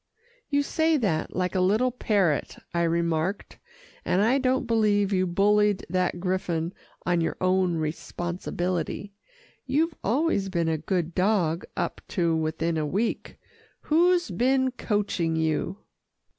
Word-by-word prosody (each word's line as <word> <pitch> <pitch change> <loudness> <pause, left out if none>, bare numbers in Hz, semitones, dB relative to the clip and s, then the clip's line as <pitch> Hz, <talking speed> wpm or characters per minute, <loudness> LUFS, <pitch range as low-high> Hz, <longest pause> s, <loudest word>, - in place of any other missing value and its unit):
"You 285 -1 +2
say 315 +2 +2
that 185 - -1
like 180 0 -1
a 190 - +1
little 215 +7 +3
parrot," 200 - 0 0.2
I 170 - +1
remarked, 170 +2 -1 0.4
"and 190 +3 +2
I 250 +5 +3
don't 260 0 +1
believe 210 -3 +2
you 185 -1 +2
bullied 205 +2 +2
that 180 -1 0
griffon 175 -2 -1 0.3
on 175 -1 +2
your 165 - -1
own 185 -1 +2
responsibility. 175 +4 -3 0.5
You've 310 +5 +1
always 230 -4 +1
been 170 -3 0
a 160 -1 0
good 175 0 -2
dog 180 -4 +1
up - - -2 0.2
to 170 -2 +2
within 160 +1 -1
a 155 - 0
week. 210 +9 -2 0.4
Who's 350 +3 +3
been 260 +1 +2
coaching 205 -8 -1
you?" 160 +4 -1
185 Hz, 130 wpm, -26 LUFS, 170-225 Hz, 0.5 s, little